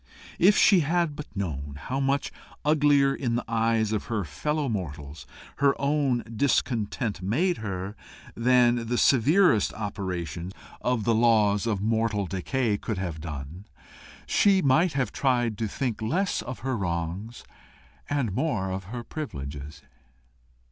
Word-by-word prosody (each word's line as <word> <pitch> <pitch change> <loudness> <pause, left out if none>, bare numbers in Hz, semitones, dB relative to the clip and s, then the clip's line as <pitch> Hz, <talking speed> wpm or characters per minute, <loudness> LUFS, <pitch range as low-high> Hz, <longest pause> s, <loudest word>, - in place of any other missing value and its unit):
If 200 +4 +5
she 195 - +6
had 165 0 0
but 150 - -7
known 75 -7 -4
how 130 - -3
much 140 +1 0 0.3
uglier 145 -2 +4
in 120 -4 -2
the 120 - -2
eyes 115 -1 +1
of 110 -2 -1
her 110 -4 -2
fellow 145 - -2
mortals 75 - -5 0.3
her 140 -1 +2
own 140 -3 +1
discontent 115 -4 0
made 155 - +1
her, 100 -2 -5 0.4
than 120 -1 +3
the 120 +1 0
severest 140 - +4
operation 90 -4 -4 0.3
of 125 -3 0
the 115 - +2
laws 110 -2 +3
of 100 -3 -1
mortal 110 -2 +1
decay 100 +4 -1
could 110 - -3
have 85 -4 -4
done, 80 +4 -7 0.6
she 200 -2 +4
might 155 +6 +3
have 130 -6 -1
tried 120 -4 +1
to 110 - 0
think 115 +1 -3
less 170 - 0
of 130 +1 -7
her 130 +1 -1
wrongs 90 +4 -4 0.7
and 140 -8 0
more 105 -8 -1
of 95 0 -4
her 120 +5 -6
privileges. 70 - -7
115 Hz, 140 wpm, -26 LUFS, 95-135 Hz, 0.7 s, she